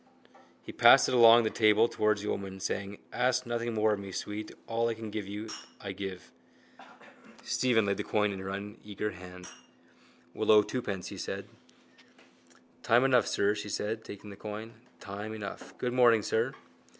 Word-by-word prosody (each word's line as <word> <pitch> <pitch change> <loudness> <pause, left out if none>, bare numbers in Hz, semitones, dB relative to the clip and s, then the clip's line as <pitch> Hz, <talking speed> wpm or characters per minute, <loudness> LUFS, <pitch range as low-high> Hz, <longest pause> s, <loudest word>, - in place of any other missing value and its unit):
He - - -8
passed - - +7
it - - -1
along 120 -1 +8
the 110 - 0
table 110 +1 +4
towards 105 -3 0
the 105 - -3
old - - -1
woman, 95 -1 -8
saying: 100 +1 -3 0.2
—Ask 125 +1 +1
nothing 120 -1 -2
more 110 0 +3
of 105 - -3
me, 100 -1 -8
sweet. 105 +3 -5
All 115 +1 0
I 115 - -2
can 110 -1 -7
give 105 -2 -4
you 105 +2 -6 0.3
I 100 - -6
give. 95 -1 -7 1.1
Stephen 120 -4 +2
laid 100 0 0
the - - -2
coin 105 -1 +1
in 95 - -6
her 95 0 -6
uneager 105 +1 -5
hand. 90 0 -11 0.9
—We'll - - -3
owe 105 -1 +7
twopence, 100 -6 -4
he - - -8
said. - - -5 1.3
—Time 120 +3 +4
enough, 125 -4 +4
sir, 100 +1 +2
she 105 0 -6
said, 110 +3 -3
taking 100 0 -10
the - - -9
coin. 110 +3 -7 0.3
Time 105 +2 -6
enough. 105 -2 -8
Good 125 -1 -2
morning, 120 -4 +5
sir. 115 +6 0
105 Hz, 175 wpm, -30 LUFS, 100-115 Hz, 1.3 s, along